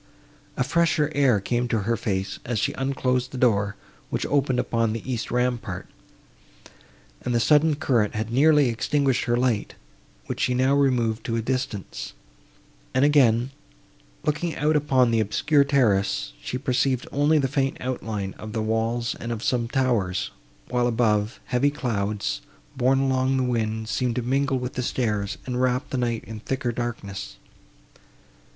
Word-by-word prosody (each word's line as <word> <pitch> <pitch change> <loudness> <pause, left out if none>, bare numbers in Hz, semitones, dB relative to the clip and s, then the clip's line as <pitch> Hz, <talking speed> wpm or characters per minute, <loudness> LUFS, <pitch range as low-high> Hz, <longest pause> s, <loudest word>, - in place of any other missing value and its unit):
A - - +2
fresher 155 +1 +2
air 135 -7 +3
came 120 +5 -1
to 115 -3 0
her 115 +4 0
face, 95 -4 -2
as 120 -1 -2
she - - 0
unclosed 130 -2 -1
the 130 - -7
door, 105 -4 +2 0.3
which - - -2
opened 135 -2 +1
upon 115 -2 0
the 115 +3 -5
east 120 -2 -3
rampart, 120 -7 -1 1.4
and 125 - -1
the - - +3
sudden 150 +4 +4
current 115 -8 +1
had 110 +1 -3
nearly 150 +1 +5
extinguished 135 +3 +1
her 120 0 +1
light, 120 -4 0 0.5
which - - -5
she 125 - +1
now 130 +2 +3
removed 125 -5 +2
to 115 - -1
a 115 - 0
distance; 125 -5 -3 0.8
and 130 +2 +4
again, 130 -4 +4 0.7
looking 155 +3 -1
out 150 +1 +1
upon 130 -5 +3
the 115 - +2
obscure 140 +7 +3
terrace, 100 - +1
she 125 - -3
perceived 130 -1 0
only 145 +3 +3
the 135 -3 +2
faint 135 0 0
outline 110 -6 -3
of 110 0 -7
the 110 -1 -1
walls 115 +2 0
and 120 - -4
of 115 -1 -4
some 120 -2 +1
towers, 110 -8 0 0.4
while, 125 -1 +1
above, 110 -2 +1
heavy 130 +3 +2
clouds, 105 - -2 0.3
borne 130 +2 +3
along 130 0 +1
the 130 - +1
wind, 110 -3 -1
seemed 120 +1 -1
to 125 - -1
mingle 135 +2 +1
with 125 0 -4
the 125 - -2
stars, 105 -5 -1
and 125 -1 -2
wrap 125 0 0
the 130 - -1
night 120 -2 -1
in 110 -1 -8
thicker 130 +2 -2
darkness. 105 -5 -5
125 Hz, 160 wpm, -25 LUFS, 110-135 Hz, 1.4 s, nearly